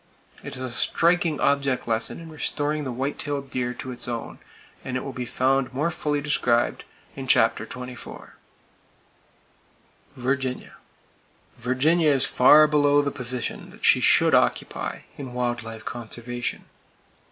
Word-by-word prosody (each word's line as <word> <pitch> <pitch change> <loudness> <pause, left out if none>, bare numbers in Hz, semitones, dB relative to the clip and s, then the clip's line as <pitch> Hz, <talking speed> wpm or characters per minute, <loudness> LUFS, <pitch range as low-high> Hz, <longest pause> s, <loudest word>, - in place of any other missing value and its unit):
It - - -6
is 130 - -6
a 130 - -3
striking 170 +4 +2
object 140 -3 +1
lesson 115 +5 -1
in 165 -1 -10
restoring 150 -1 -2
the 130 - -3
white 130 +4 -3
tailed 140 -2 -3
deer 125 -1 -1
to 130 - -6
its 125 - -3
own, 120 -2 -5 0.4
and 130 -1 -3
it - - -4
will 135 - -6
be 125 -1 -5
found 130 0 +1
more 150 +5 0
fully 145 -2 -1
described 125 -5 +1 0.3
in - - -6
chapter - - +3
XXIV. 125 -1 -9 1.8
Virginia: 130 0 -2 0.8
Virginia 150 +6 +2
is 135 -3 +3
far 150 +4 +7
below 145 -1 +3
the 140 - -1
position 125 -2 -4
that - - -7
she - - +6
should - - +4
occupy - - 0 0.2
in 130 -3 -7
wild 120 -1 -1
life 115 0 -9
conservation. 120 +1 -5
130 Hz, 140 wpm, -24 LUFS, 125-145 Hz, 1.8 s, far